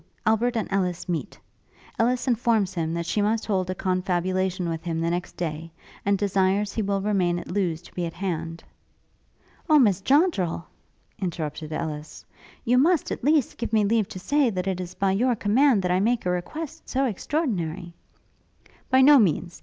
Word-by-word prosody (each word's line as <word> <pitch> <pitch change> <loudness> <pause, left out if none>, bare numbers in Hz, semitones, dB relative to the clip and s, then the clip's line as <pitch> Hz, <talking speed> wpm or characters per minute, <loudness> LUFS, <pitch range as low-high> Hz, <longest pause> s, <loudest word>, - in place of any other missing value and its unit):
Albert 230 +3 +2
and 220 - -1
Ellis 180 -3 -1
meet. 165 -7 -3 0.6
Ellis 245 +3 +1
informs 230 -5 +1
him 165 -2 -2
that 170 0 -2
she 205 +5 0
must 215 +2 0
hold 185 -3 -1
a 185 - -2
confabulation 185 0 -1
with 165 -1 -3
him 165 -1 -3
the 165 +1 0
next 175 +1 -4
day; 165 -1 -4 0.3
and 200 0 +2
desires 200 0 +1
that - - -15
he - - +2
will 200 -1 -1
remain 185 -4 +1
at 175 - -7
Lewes 175 -4 -1
to - - -16
be 175 -1 -2
at 165 - -7
hand. 165 -3 -4 0.5
' - - -35
'Oh, 305 - +7
Miss 205 -9 +4
Joddrel!' 260 - +2 0.5
interrupted 160 -4 -4
Ellis, 155 -1 -5 0.4
'you 250 +2 +4
must, 330 +3 +2
at - - -4
least, 295 -1 +2
give 235 - -3
me 215 -2 +4
leave 215 -1 +2
to - - -8
say, 285 +6 +2
that 185 -4 -3
it 190 -1 -2
is 180 0 -8
by 195 -1 +1
your 240 +5 +2
command 225 +1 +3
that 180 - 0
I 180 - +2
make 230 +2 +1
a 180 - +1
request 280 - -5
so 270 +1 +1
extraordinary!' 190 - -2 1.0
'By 260 0 +5
no 285 0 +8
means. 175 -3 0
190 Hz, 185 wpm, -25 LUFS, 175-230 Hz, 1.0 s, no